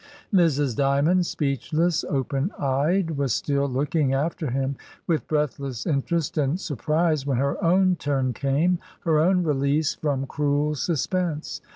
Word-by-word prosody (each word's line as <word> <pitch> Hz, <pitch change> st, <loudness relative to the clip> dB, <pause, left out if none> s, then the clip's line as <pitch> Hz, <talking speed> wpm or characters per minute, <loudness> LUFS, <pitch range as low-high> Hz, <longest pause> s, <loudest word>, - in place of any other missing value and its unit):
Mrs. 145 Hz, -, +3 dB
Dymond, 145 Hz, +7 st, +2 dB
speechless, 155 Hz, +4 st, 0 dB
open 135 Hz, +3 st, -1 dB
eyed, 155 Hz, +5 st, 0 dB
was 135 Hz, -5 st, +1 dB
still 140 Hz, -1 st, 0 dB
looking 140 Hz, +1 st, 0 dB
after 155 Hz, +1 st, -1 dB
him 135 Hz, +2 st, -1 dB, 0.3 s
with 165 Hz, -3 st, -1 dB
breathless 140 Hz, -5 st, -2 dB
interest 155 Hz, +2 st, -1 dB
and 145 Hz, +5 st, 0 dB
sur 155 Hz, -6 st, -4 dB
prise, 155 Hz, +1 st, 0 dB
when 135 Hz, -3 st, +1 dB
her 140 Hz, +2 st, -1 dB
own 185 Hz, +1 st, +3 dB
turn 135 Hz, -4 st, -1 dB
came, 150 Hz, +7 st, +1 dB, 0.2 s
her 160 Hz, -2 st, +2 dB
own 180 Hz, +3 st, +3 dB
release 145 Hz, 0 st, +1 dB
from 140 Hz, -3 st, -2 dB
cruel 145 Hz, +2 st, 0 dB
suspense. 165 Hz, +2 st, -2 dB
145 Hz, 140 wpm, -24 LUFS, 140-165 Hz, 0.3 s, Mrs